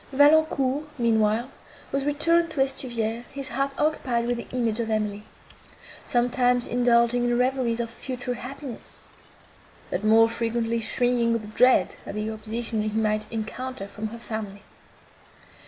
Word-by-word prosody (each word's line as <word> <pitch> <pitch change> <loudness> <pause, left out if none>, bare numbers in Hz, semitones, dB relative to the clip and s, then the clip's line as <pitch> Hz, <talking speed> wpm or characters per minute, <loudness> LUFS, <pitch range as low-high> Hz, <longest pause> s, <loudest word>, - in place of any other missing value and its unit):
Valancourt, 290 -1 +4
meanwhile, 225 +1 +2 0.4
was 275 0 -1
returned 335 +4 +2
to 295 - -5
Estuvière, 240 -4 -1
his 275 0 -6
heart 275 0 -1
occupied 255 -6 0
with 245 0 0
the 235 - -7
image 235 -3 -1
of 230 -1 -1
Emily; 210 -1 -1 0.8
sometimes 245 0 +2
indulging 240 0 +3
in 240 0 +1
reveries 250 -2 +1
of 235 - -1
future 250 0 -4
happiness, 265 0 -8 0.8
but - - -2
more 225 +1 +6
frequently 230 0 -1
shrinking 240 0 +1
with 215 -2 -4
dread 250 +3 +4
of - - -5
the 215 +1 -2
opposition 220 +1 -3
he 215 0 -2
might 215 -1 0
encounter 230 0 -5
from 215 +2 -5
her 230 +2 -8
family. 215 -3 -6
235 Hz, 140 wpm, -25 LUFS, 220-260 Hz, 0.8 s, more